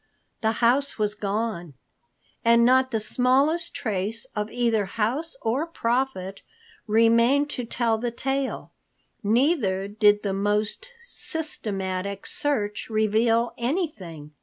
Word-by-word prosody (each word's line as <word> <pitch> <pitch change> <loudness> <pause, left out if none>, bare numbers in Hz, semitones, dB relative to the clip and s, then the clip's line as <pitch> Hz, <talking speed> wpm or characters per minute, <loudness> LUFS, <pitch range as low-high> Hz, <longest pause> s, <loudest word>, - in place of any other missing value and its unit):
The 220 -1 +1
house 275 +4 +2
was 210 -1 0
gone, 205 -6 -3 0.7
and 235 0 +5
not 260 +1 +4
the 225 -3 -1
smallest 270 +9 +2
trace 215 0 -3
of 210 0 -2
either 230 -4 +1
house 235 - -2
or 255 +9 0
Prophet 235 - -2 0.5
remained 230 +6 +4
to 250 - -4
tell 230 -1 0
the 240 +1 -1
tale. 270 +3 -3 0.5
Neither 215 - +1
did 210 0 +3
the 200 -2 -1
most 210 - -1
systematic 200 - -3
search 215 -10 -1
reveal 225 +2 +2
anything. 235 - -3
225 Hz, 110 wpm, -25 LUFS, 205-260 Hz, 0.7 s, and